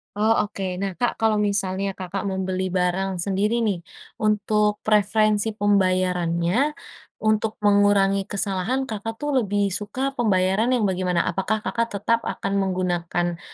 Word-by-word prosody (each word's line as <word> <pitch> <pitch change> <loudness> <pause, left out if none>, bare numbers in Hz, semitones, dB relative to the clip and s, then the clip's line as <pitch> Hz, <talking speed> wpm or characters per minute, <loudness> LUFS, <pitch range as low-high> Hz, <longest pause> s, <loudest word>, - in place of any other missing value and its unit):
Oh 215 +2 +2
oke, 200 -1 -6 0.2
nah 195 -1 -1
Kak, 245 - +2
kalau 220 -1 +1
misalnya 195 -1 -1
Kakak 190 +1 -5
membeli 190 -1 -2
barang 185 +1 0
sendiri 210 +5 0
nih, 200 -5 0 0.4
untuk 210 0 +1
preferensi 215 0 +2
pembayarannya, 185 -4 +1 0.7
untuk 215 0 +1
mengurangi 200 -1 +3
kesalahan, 200 +6 -1
Kakak 225 -2 -5
tuh 295 +5 -4
lebih 205 -3 0
suka 210 +8 -2
pembayaran 205 -3 +1
yang 240 - 0
bagaimana? 185 -3 +1
Apakah 195 +5 -1
Kakak, 230 0 -1
tetap 230 +4 +1
akan - - -3
menggunakan 175 -2 -1
200 Hz, 130 wpm, -23 LUFS, 185-215 Hz, 0.7 s, mengurangi